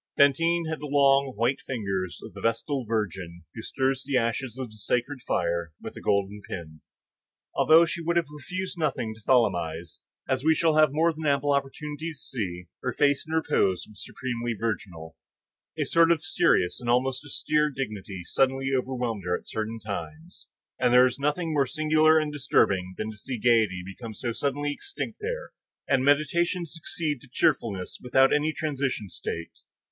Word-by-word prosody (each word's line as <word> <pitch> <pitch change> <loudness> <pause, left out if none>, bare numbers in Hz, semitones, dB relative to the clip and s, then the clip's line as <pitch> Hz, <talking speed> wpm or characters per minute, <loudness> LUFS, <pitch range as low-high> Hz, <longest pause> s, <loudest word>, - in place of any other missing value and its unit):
Fantine 165 +5 +4
had 160 -1 -3
the 150 - -5
long, 140 -1 +4
white, 120 +5 +1
fine 130 - -5
fingers 95 -5 -3
of - - -10
the - - -9
vestal 115 +4 -1
virgin 95 -6 -3
who 115 - -7
stirs 135 +2 -1
the 135 -2 0
ashes 120 +1 -1
of 130 -4 -5
the 110 - -15
sacred 125 +6 -1
fire 85 -5 -1
with - - -8
a - - -8
golden 100 +1 0
pin. 80 -5 -8 0.7
Although 160 +2 +6
she 170 +1 -4
would 170 +1 0
have 170 - +3
refused 180 +5 -5
nothing 135 -8 -1
to 110 - -17
Tholomyès, 85 -9 +1 0.3
as 130 0 0
we 160 +1 +4
shall 165 -1 +3
have 155 -2 +5
more 165 +3 +2
than 155 0 -4
ample 140 0 +2
opportunity 150 +3 -3
to - - -19
see, 90 -10 -5 0.2
her 125 - -1
face 145 +3 +2
in 160 - -5
repose 95 - +1
was 105 -2 -9
supremely 120 -2 -3
virginal; 85 -8 -4 0.6
a - - +1
sort 165 0 +4
of 160 -2 +2
serious 90 - +2
and 120 - -4
almost 130 +2 +1
austere 150 +1 +1
dignity 105 -9 -5
suddenly 135 +4 +1
overwhelmed 125 -4 -2
her 90 - +1
at - - -18
certain 110 +1 -3
times, 160 - -7 0.3
and 125 -1 +3
there 125 +1 +8
was 130 +1 -1
nothing 155 +3 0
more 140 -3 +2
singular 155 +1 +4
and 155 -1 0
disturbing 95 -10 +1
than 110 0 -3
to 110 - -13
see 125 +4 -5
gayety 110 -6 +3
become 110 +3 -8
so 120 +1 -3
suddenly 145 +4 -1
extinct 395 - -6
there, - - -4 0.4
and 135 -2 +3
meditation 170 +5 +2
succeed 155 -3 -3
to 140 - -16
cheerfulness 100 -7 0
without 130 +2 +4
any 150 +1 +2
transition 140 -8 -2
state. 85 -2 -6
130 Hz, 175 wpm, -27 LUFS, 110-150 Hz, 0.7 s, there